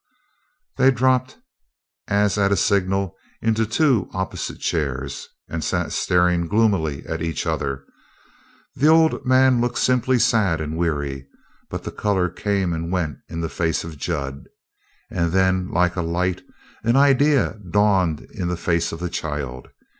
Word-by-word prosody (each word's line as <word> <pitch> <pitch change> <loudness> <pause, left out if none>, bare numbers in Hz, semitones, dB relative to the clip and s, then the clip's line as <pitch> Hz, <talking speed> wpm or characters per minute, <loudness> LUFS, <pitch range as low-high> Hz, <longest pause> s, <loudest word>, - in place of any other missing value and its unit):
They 130 0 +5
dropped, 130 0 +1 0.7
as 105 0 +2
at 100 -1 +2
a - - +4
signal, 95 -1 +1 0.2
into 115 0 +1
two 125 - +2
opposite 95 0 -4
chairs, 70 -3 -3 0.2
and 80 -1 -4
sat - - -1
staring 90 -1 +2
gloomily 95 -9 +1
at 80 0 -4
each 80 -1 -2
other. 70 -1 -2 0.9
The 145 - +2
old 160 0 +4
man 130 -1 +4
looked 120 0 -1
simply 125 0 +2
sad 110 -8 +2
and 80 0 -4
weary, 70 -5 -2 0.4
but - - -5
the - - -5
color 95 -4 0
came 95 0 -1
and 85 +1 -4
went 80 -7 -2
in 85 0 -4
the 80 - -1
face 80 0 -1
of 80 -3 -9
Jud. 70 -5 -4 0.7
And 85 -1 0
then, 95 -1 +2
like 90 0 +1
a 90 - -1
light, 90 +2 -1 0.4
an 115 +2 +2
idea 140 -3 +3
dawned 95 -5 +2
in 90 - -3
the 90 0 -2
face 85 -1 0
of 80 - -6
the 90 - -1
child. 70 -6 -4
90 Hz, 150 wpm, -22 LUFS, 80-110 Hz, 0.9 s, They